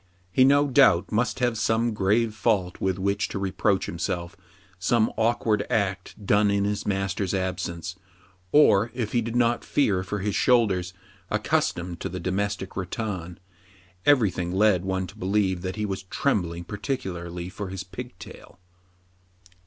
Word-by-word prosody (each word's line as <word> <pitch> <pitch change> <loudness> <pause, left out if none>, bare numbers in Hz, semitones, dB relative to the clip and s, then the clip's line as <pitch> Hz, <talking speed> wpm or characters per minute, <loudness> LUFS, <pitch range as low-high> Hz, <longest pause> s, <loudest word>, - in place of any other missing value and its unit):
He, 130 - +5
no 145 +2 +5
doubt, 130 -10 +4
must 105 -1 0
have 120 -3 +1
some 115 +1 +1
grave 105 +3 +1
fault 105 -5 0
with 95 -1 0
which 100 +1 0
to - - -5
reproach 100 +1 0
himself, 85 +1 -3 0.4
some 110 +4 +2
awkward 110 -2 +1
act 100 -2 -2
done 105 +1 +4
in 100 0 +1
his 105 0 -2
master's 95 -1 -1
absence; 90 -1 -3 0.5
or 115 -7 +5
if 115 -4 -2
he 120 - +2
did 115 +1 -4
not 120 -1 +2
fear 105 -10 +1
for 100 +2 -4
his 100 +1 -2
shoulders, 95 -9 +2 0.4
accustomed 85 -1 -1
to 95 - -4
the 90 +1 -5
domestic 95 +2 -2
rattan, 95 -2 -4 0.7
every 125 -8 +4
thing 90 -1 -3
led 95 -1 +3
one 95 0 -1
to - - -12
believe 95 -1 0
that 95 0 -4
he 105 - -2
was 95 -2 -3
trembling 90 -4 -1
particularly 90 -5 -4
for 100 +2 -6
his 95 0 -5
pigtail. 95 -2 -10
100 Hz, 150 wpm, -25 LUFS, 90-110 Hz, 0.7 s, He